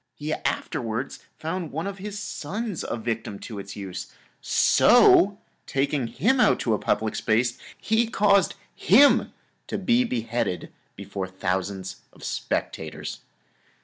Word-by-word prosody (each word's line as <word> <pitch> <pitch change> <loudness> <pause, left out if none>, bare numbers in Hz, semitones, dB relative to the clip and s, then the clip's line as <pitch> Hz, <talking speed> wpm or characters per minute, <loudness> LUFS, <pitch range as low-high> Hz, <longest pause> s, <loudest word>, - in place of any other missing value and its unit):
He 150 +1 -3
afterwards 125 -3 -3 0.2
found 165 0 -4
one 160 +5 -3
of 200 -1 -5
his 205 +1 -6
sons 190 - -4
a - - -3
victim 115 -3 -3
to 110 -4 -7
its 100 0 -8
use, 95 -2 -6 0.3
so - - +5 0.3
taking 135 -2 0
him 225 - +1
out - - +4
to 115 - +1
a 105 - 0
public 110 +1 0
place, 120 +2 +1 0.2
he 225 +1 +1
caused 200 -4 +3 0.2
him 270 +10 +5 0.4
to - - -3
be 235 +6 +3
beheaded 115 - -2 0.2
before 100 -1 -5
thousands 95 +1 -3 0.2
of - - -16
spectators. 80 -1 -4
125 Hz, 130 wpm, -25 LUFS, -, 0.4 s, so